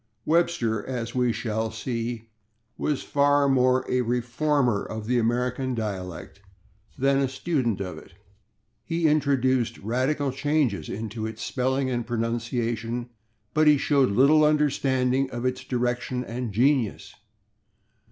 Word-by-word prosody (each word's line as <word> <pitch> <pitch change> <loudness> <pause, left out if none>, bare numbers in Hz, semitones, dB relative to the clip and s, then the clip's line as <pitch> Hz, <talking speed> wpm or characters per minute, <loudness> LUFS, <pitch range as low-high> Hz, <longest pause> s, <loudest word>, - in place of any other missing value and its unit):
Webster, 150 -10 +1
as 120 -3 -4
we 125 -1 +2
shall 110 -1 -2
see, 115 0 -4 0.4
was 150 -3 -1
far 145 0 +3
more 130 -1 +3
a 125 - +1
reformer 125 0 0
of 110 -1 -6
the 125 +2 +1
American 125 +2 0
dialect 100 -4 -5 0.6
than 135 +1 +2
a 135 - +2
student 135 - -1
of 95 -2 -5
it. - - -17 0.7
He 165 +7 -1
introduced 130 -5 +1
radical 130 +6 -1
changes 135 - 0
into 110 +1 -4
its 110 0 -7
spelling 130 +1 0
and 120 -1 -1
pronunciation, 120 0 -2 0.4
but 155 0 +3
he 150 -1 +7
showed 140 -1 +2
little 140 +9 +5
understanding 135 -3 +2
of 120 0 -5
its 130 0 -1
direction 125 0 -2
and 120 -1 -4
genius. 125 +1 +1
125 Hz, 125 wpm, -25 LUFS, 115-135 Hz, 0.7 s, he